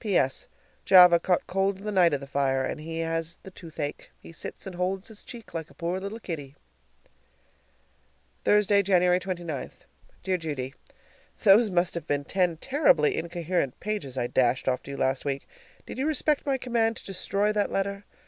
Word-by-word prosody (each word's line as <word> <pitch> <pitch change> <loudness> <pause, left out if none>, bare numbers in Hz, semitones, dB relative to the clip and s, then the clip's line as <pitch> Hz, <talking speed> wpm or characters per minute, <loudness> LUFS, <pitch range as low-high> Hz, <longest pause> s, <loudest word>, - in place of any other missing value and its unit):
P.S. 175 - +1 0.4
Java 180 -2 +8
caught 180 +1 +1
cold 195 +1 0
the 210 +2 -5
night 180 -4 +5
of 145 -1 -1
the - - -6
fire 135 -1 0
and - - -4
he 165 +1 -6
has 165 0 -2
the 190 - -10
toothache. 160 -5 -6
He - - -13
sits - - -7
and 190 - -6
holds 185 +3 -2
his 215 -2 -8
cheek 235 -3 -11
like 165 -2 -5
a 140 - -19
poor 170 +4 -2
little 200 +4 -6
kiddie. 145 -9 -6 1.9
Thursday, 205 -1 +4
January 180 -2 +3
29. 175 -6 -4 0.5
Dear 185 -1 +1
Judy: 145 -6 -4 0.7
Those 215 +1 +6
must 180 -1 +1
have 170 - -5
been 145 0 0
ten 180 -2 +1
terribly 390 - +3
incoherent 170 -5 -2
pages 205 -12 -4
I 120 - 0
dashed 125 +1 +1
off 130 -1 +1
to - - -10
you 140 - -5
last 130 0 0
week. 140 -1 -3 0.4
Did - - -7
you 275 - 0
respect 300 -1 +1
my 270 -1 +2
command 235 -3 0
to - - -13
destroy 200 +2 0
that 210 -1 0
letter? 200 +1 -2
180 Hz, 175 wpm, -27 LUFS, 150-200 Hz, 1.9 s, Java